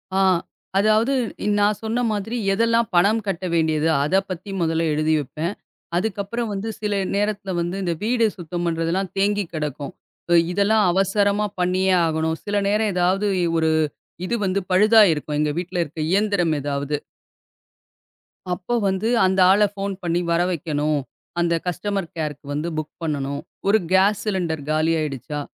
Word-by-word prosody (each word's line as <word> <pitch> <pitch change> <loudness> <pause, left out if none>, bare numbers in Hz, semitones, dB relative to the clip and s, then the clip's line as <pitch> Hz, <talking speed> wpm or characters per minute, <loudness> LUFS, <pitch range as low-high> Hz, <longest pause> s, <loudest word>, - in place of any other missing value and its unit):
ஆ - - +3 0.6
அதாவது 215 +5 +3 0.5
நான் 205 0 +2
சொன்ன 225 +2 -1
மாதிரி, 215 +3 -3 0.2
"எதெல்லாம் 230 +2 +2
பணம் 205 +6 +4
கட்ட 190 -1 -2
வேண்டியது?" 160 -1 +2 0.2
அத 150 +6 0
பத்தி 185 +2 -6
மொதல்ல 165 0 +1
எழுதி 155 +1 +1
வைப்பேன். 150 +6 -4 0.4
அதுக்கு 205 +2 -2
அப்புறம் 235 +3 -3
வந்து 200 +3 -3
சில 210 -1 -1 0.2
நேரத்துல 205 -1 -1
வந்து 175 +2 -3
இந்த 175 -2 0
வீடு 230 +1 +2
சுத்தம் 175 0 -4
பண்றதுல்லாம் 170 +3 -1
தேங்கி 205 +1 +2
கெடக்கும். 150 -3 -4 0.4
ம். 170 - +7
இதெல்லாம் 205 +3 +3
அவசரமா 200 +2 +2
பண்ணியே 185 +1 +2
ஆகணும். 160 0 -1
சில 205 0 -2
நேரம் 210 +1 +1
ஏதாவது 185 +3 +1 0.3
ஒரு 160 0 +2 0.6
இது 235 - -1
வந்து 195 +1 0
பழுதா 215 +4 +6
இருக்கும், 150 -1 -3
எங்க 150 0 +1
வீட்டுல 180 0 -3
இருக்க 160 +1 -9
இயந்திரம் 195 -4 +2
எதாவது. 145 +1 -2 1.6
அப்போ 180 +6 -4
வந்து 190 +3 0 0.2
அந்த 190 +1 +1
ஆள 200 +2 +4
ஃபோன் 200 0 -3
பண்ணி 170 0 0
வர 170 +1 +3
வைக்கணும். 155 -3 -1 0.4
அந்த 170 -1 +2
கஸ்டமர் 190 +1 -2
கேர்க்கு 150 -2 -4
வந்து 150 +3 -2
புக் 155 -1 -4
பண்ணணும். 140 -2 -2 0.3
ஒரு 215 +2 +5
காஸ் 195 +2 +4
சிலிண்டர் 175 -7 -1
காலி 155 +1 +2
ஆயிடுச்சா? 150 -1 -4
185 Hz, 150 wpm, -22 LUFS, 160-205 Hz, 1.6 s, ம்